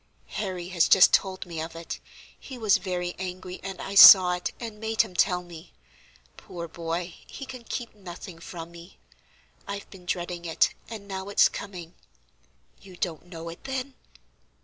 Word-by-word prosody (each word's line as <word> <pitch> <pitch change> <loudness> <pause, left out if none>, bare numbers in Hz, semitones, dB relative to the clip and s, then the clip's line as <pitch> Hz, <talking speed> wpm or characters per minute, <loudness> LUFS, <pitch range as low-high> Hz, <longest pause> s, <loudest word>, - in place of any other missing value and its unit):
"Harry 185 -3 -4
has 175 -3 +3
just 190 - +7
told 190 -1 +1
me 165 -3 -5
of 165 +1 -6
it; 165 0 -6 0.4
he 265 - -9
was 215 -4 +3
very 180 -1 -3
angry, 185 0 -6
and 195 -1 -7
I 195 - -5
saw 185 -2 +10
it, 180 0 -3
and 225 -3 -7
made 220 +1 +2
him 205 -5 -11
tell 180 -1 +2
me. 170 -1 -13 0.6
Poor 170 -1 -8
boy, 170 +1 -4
he 275 - -8
can 255 -2 -9
keep 235 +1 -5
nothing 180 -3 -10
from 170 0 -8
me. 170 +2 -14 0.7
I've 200 0 -6
been 180 -2 -14
dreading 175 -1 -3
it, 165 - +2 0.2
and 215 -3 -8
now 190 0 -5
it's 200 - +5
coming. 180 -4 -8 0.9
You 185 -2 -14
don't 170 -1 -4
know 165 -2 -8
it, 165 - -11
then? 265 0 -4
180 Hz, 170 wpm, -26 LUFS, 170-200 Hz, 0.9 s, saw